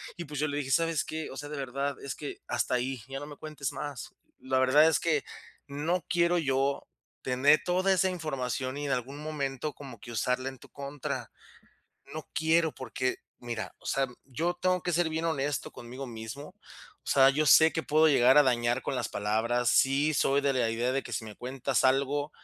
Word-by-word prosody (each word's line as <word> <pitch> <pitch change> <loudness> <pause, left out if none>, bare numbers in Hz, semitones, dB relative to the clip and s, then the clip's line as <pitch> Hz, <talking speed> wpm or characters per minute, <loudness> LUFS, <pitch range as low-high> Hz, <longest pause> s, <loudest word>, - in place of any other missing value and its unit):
y 175 - -5
pues 150 -3 -6
yo 155 - +1
le 145 - -3
dije: 140 -2 -3
"¿Sabes 165 +2 +2
qué?, 160 0 -5
o - - -9
sea, 145 +2 -7
de 150 - -5
verdad, 140 +1 -3
es 140 - -5
que 145 - -7
hasta 120 +1 0
ahí, 125 0 -2
ya 135 0 -4
no 145 - -7
me 150 - -9
cuentes 150 -2 -5
más, 145 -5 -6 0.2
la 130 0 0
verdad 145 +5 +6
es 155 -5 +2
que 155 -4 +1 0.4
no 155 +5 -2
quiero 175 0 +2
yo, 140 -2 0 0.4
tener 135 +4 +4
toda 185 +2 +2
esa 190 0 +2
información 135 -6 -3
y 145 - -4
en - - -1
algún 130 +3 -3
momento 150 -2 -3
como 140 -1 -11
que 120 - -10
usarla 125 +3 -1
en 135 - -11
tu - - -16
contra, 140 0 -5 0.8
no - - -7
quiero, 160 0 +3
porque, 130 0 -2 0.2
mira, 115 -5 -5
o - - -15
sea, 135 0 +1 0.2
yo 160 +7 -1
tengo 185 -1 +1
que 175 - -1
ser 170 0 +2
bien 160 +1 -3
honesto 145 -3 -1
conmigo 125 +3 -8
mismo, 115 +5 -7
o - - -27 0.5
sea, 135 -1 +6
yo 150 +3 0
sé 160 +2 +7
que 160 - -2
puedo 155 +1 +4
llegar 130 -2 +5
a 150 - +9
dañar 120 -2 +1
con - - -3
las - - -2
palabras, 115 +4 0
sí, 140 +3 +3
soy 140 -1 +2
de 140 -1 +2
la 125 -3 +1
idea 120 +3 0
de 135 +1 0
que - - -6
si 115 - -3
me 110 -1 -9
cuentas 130 +2 -1
algo, 140 +3 +2
140 Hz, 210 wpm, -29 LUFS, 130-155 Hz, 0.8 s, a